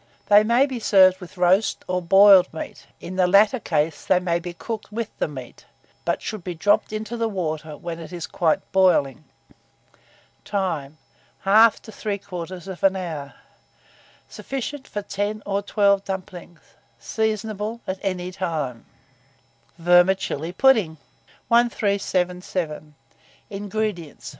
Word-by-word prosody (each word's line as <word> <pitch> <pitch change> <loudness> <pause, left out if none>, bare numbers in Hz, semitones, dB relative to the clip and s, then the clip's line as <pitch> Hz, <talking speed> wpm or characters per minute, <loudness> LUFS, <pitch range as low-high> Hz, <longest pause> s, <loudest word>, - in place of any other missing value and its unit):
They 205 0 +7
may 235 +5 +3
be 260 -4 -5
served 190 -4 +5
with 185 +2 -12
roast 185 +4 +2
or 180 0 -1
boiled 195 +1 +6
meat; 160 - -8
in 185 +1 -8
the 185 -1 +4
latter 205 +6 +4
case 150 -6 -1
they 185 - +3
may 175 -2 0
be 175 +1 -6
cooked 215 +4 -7
with 225 0 -4
the - - +1
meat, 130 -5 -10 0.4
but - - -1
should 215 -5 -5
be 180 -1 -5
dropped 205 +7 +2
into 215 +2 -4
the 230 -1 -1
water 155 -6 -4
when 170 +1 -6
it 165 - -9
is 175 -2 -5
quite 165 -3 -1
boiling. 160 -7 +2 1.2
Time. 165 -8 -3 0.5
1/2 215 +3 +6
to 220 - -12
3/4 190 -2 -3
hour. 155 -6 -6 0.9
Sufficient 270 +1 -6
for 205 - -5
10 205 +2 -3
or 200 0 -1
12 200 -1 +2
dumplings. 185 -3 -7 0.4
Seasonable 215 - -3
at 190 0 -4
any 180 -2 -3
time. 155 -10 -4 0.9
VERMICELLI 175 -2 +2
PUDDING. 215 -9 +3 0.5
1377. 180 -8 0 0.6
INGREDIENTS. 200 -5 -4
190 Hz, 125 wpm, -23 LUFS, 170-210 Hz, 1.2 s, They